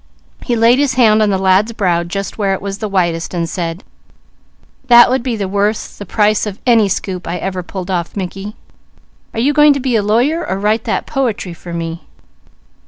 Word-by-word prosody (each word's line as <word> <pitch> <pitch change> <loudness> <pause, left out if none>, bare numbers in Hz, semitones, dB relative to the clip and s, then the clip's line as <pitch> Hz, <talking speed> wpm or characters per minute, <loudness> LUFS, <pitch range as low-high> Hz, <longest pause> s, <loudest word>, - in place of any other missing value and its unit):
He 240 - -1
laid 230 +3 +4
his 280 -3 +1
hand 220 -4 +4
on 210 - +3
the 195 - +1
lad's 190 +4 +2
brow 180 -6 +1
and 170 0 -5
said: 190 -4 -2 1.0
"That 240 -1 +8
would 260 - +1
be 240 -2 -3
worth 200 +3 -2
the 205 - -6
price 215 +1 +1
of 205 0 -6
any 225 -5 +4
scoop 185 -1 -4
I 170 +1 -2
ever 185 0 -3
pulled 185 +1 -6
off, 175 -2 -3
Mickey. 195 +2 -5 0.8
Are - - -2
you 275 +5 +2
going 295 0 +6
to 280 - -3
be 255 -2 -1
a 220 - +3
lawyer 245 +11 +1
or 190 - -3
write 215 +3 0
that - - -1
poetry 230 - -2
for 175 +1 -11
me?" 165 0 -4
205 Hz, 170 wpm, -16 LUFS, 185-230 Hz, 1.0 s, That